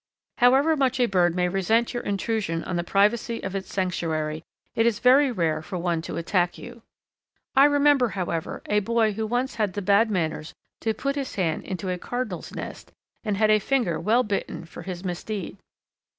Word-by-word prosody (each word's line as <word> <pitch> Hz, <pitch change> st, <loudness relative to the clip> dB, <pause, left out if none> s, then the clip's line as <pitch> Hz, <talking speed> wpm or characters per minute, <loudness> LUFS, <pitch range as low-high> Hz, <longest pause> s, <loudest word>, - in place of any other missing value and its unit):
However 270 Hz, +6 st, +5 dB
much 265 Hz, -3 st, +1 dB
a 245 Hz, -, +5 dB
bird 180 Hz, -5 st, +2 dB
may 180 Hz, -1 st, +1 dB
resent 205 Hz, +6 st, +1 dB
your 240 Hz, -, -2 dB
intrusion 200 Hz, -4 st, -2 dB
on 180 Hz, -, -4 dB
the 170 Hz, -, 0 dB
privacy 210 Hz, +5 st, +1 dB
of 190 Hz, 0 st, -4 dB
its 195 Hz, -, -5 dB
sanctuary, 160 Hz, -4 st, -2 dB, 0.3 s
it 225 Hz, +1 st, +2 dB
is 225 Hz, -3 st, +1 dB
very 265 Hz, +3 st, +5 dB
rare 165 Hz, -7 st, 0 dB
for 180 Hz, +3 st, -6 dB
one 170 Hz, -1 st, -1 dB
to -, -, -6 dB
attack 175 Hz, +1 st, 0 dB
you. 235 Hz, -, -11 dB, 0.7 s
I 270 Hz, +1 st, +8 dB
remember, 290 Hz, -3 st, +4 dB
however, 175 Hz, -5 st, -4 dB
a 210 Hz, -, +2 dB
boy 225 Hz, +1 st, +1 dB
who 220 Hz, +1 st, -3 dB
once 245 Hz, +4 st, -1 dB
had 210 Hz, -4 st, 0 dB
the 205 Hz, -, -3 dB
bad 205 Hz, +4 st, +4 dB
manners 160 Hz, -5 st, -2 dB, 0.2 s
to 220 Hz, -1 st, -1 dB
put 275 Hz, +5 st, -2 dB
his 275 Hz, -2 st, -4 dB
hand 165 Hz, -5 st, -1 dB
into 190 Hz, 0 st, -5 dB
a 180 Hz, -, -3 dB
Cardinal's 250 Hz, +6 st, -4 dB
nest -, -, -8 dB, 0.3 s
and 210 Hz, -3 st, -1 dB
had 215 Hz, +1 st, +4 dB
a 215 Hz, -, +5 dB
finger 210 Hz, -, 0 dB
well 235 Hz, +4 st, +3 dB
bitten 200 Hz, -5 st, -3 dB
for 165 Hz, -, -10 dB
his 180 Hz, -1 st, -6 dB
misdeed. 185 Hz, +2 st, -4 dB
205 Hz, 190 wpm, -25 LUFS, 180-235 Hz, 0.7 s, I